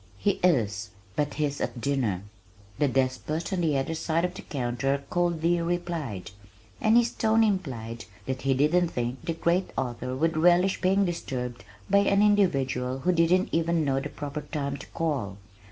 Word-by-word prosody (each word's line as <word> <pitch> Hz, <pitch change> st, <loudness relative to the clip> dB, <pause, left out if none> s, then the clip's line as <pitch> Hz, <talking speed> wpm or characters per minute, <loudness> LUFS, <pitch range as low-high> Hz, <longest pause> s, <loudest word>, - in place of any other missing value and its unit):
"He 200 Hz, -, 0 dB
is, 110 Hz, -, +2 dB, 0.3 s
but 145 Hz, 0 st, -1 dB
he's 145 Hz, -2 st, -1 dB
at 120 Hz, -, -3 dB
dinner," 120 Hz, -9 st, 0 dB, 0.6 s
the 145 Hz, -, +3 dB
despot 135 Hz, +7 st, -1 dB
on 180 Hz, -, 0 dB
the 155 Hz, -4 st, +2 dB
other 135 Hz, +4 st, -1 dB
side 165 Hz, +1 st, 0 dB
of 180 Hz, -, -3 dB
the -, -, -8 dB
counter 135 Hz, +1 st, -1 dB
coldly 175 Hz, -1 st, +1 dB
replied, 165 Hz, -, -3 dB, 0.5 s
and 220 Hz, +2 st, +5 dB
his 240 Hz, 0 st, +3 dB
tone 225 Hz, 0 st, +3 dB
implied 125 Hz, -, -2 dB, 0.2 s
that 130 Hz, -1 st, -3 dB
he 135 Hz, -1 st, +2 dB
didn't 160 Hz, +6 st, +3 dB
think 125 Hz, -3 st, -3 dB
the 165 Hz, 0 st, -1 dB
great 170 Hz, +3 st, +1 dB
author 125 Hz, 0 st, -2 dB
would 160 Hz, +4 st, +1 dB
relish 175 Hz, +3 st, +4 dB
being 195 Hz, +2 st, +3 dB
disturbed 125 Hz, -, -4 dB, 0.2 s
by 200 Hz, +1 st, +5 dB
an 200 Hz, 0 st, +3 dB
individual 135 Hz, -11 st, +2 dB
who 180 Hz, -, +2 dB
didn't 175 Hz, +2 st, +3 dB
even 165 Hz, -1 st, +1 dB
know 135 Hz, -1 st, +1 dB
the -, -, -5 dB
proper 145 Hz, +1 st, -5 dB
time 140 Hz, -3 st, -3 dB
to -, -, -11 dB
call. 135 Hz, -, -2 dB
155 Hz, 170 wpm, -27 LUFS, 130-175 Hz, 0.6 s, and